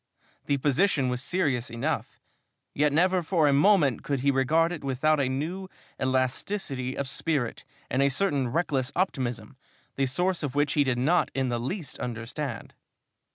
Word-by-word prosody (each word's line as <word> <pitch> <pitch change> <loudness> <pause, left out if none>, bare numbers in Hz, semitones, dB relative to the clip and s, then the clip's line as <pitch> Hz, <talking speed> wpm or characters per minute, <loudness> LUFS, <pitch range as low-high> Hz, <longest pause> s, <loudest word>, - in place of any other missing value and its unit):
The 140 - +2
position 140 0 +2
was 125 0 -2
serious 140 -7 0
enough, 115 0 -3 0.5
yet 150 +1 +2
never 180 +4 +3
for 165 -2 +2
a 140 - +4
moment 145 - +4
could 140 -3 -2
he 140 +1 +3
regard 155 +6 +2
it 170 -5 -6
without 140 +3 +1
a 135 -2 +1
new 165 +8 -3 0.3
elasticity 130 +1 -1
of 140 - -2
spirit 140 -4 -2 0.2
and 130 - 0
a 140 - +4
certain 140 -3 +1
reckless 140 -2 0
optimism, 125 - -2 0.4
the 135 -1 +2
source 180 +7 0
of 145 -4 -3
which 145 0 +2
he 145 - +3
did 130 -3 0
not 155 +8 +2
in 135 -1 0
the 120 -1 -1
least 140 - -5
understand. 120 +2 -5
140 Hz, 160 wpm, -27 LUFS, 130-165 Hz, 0.5 s, a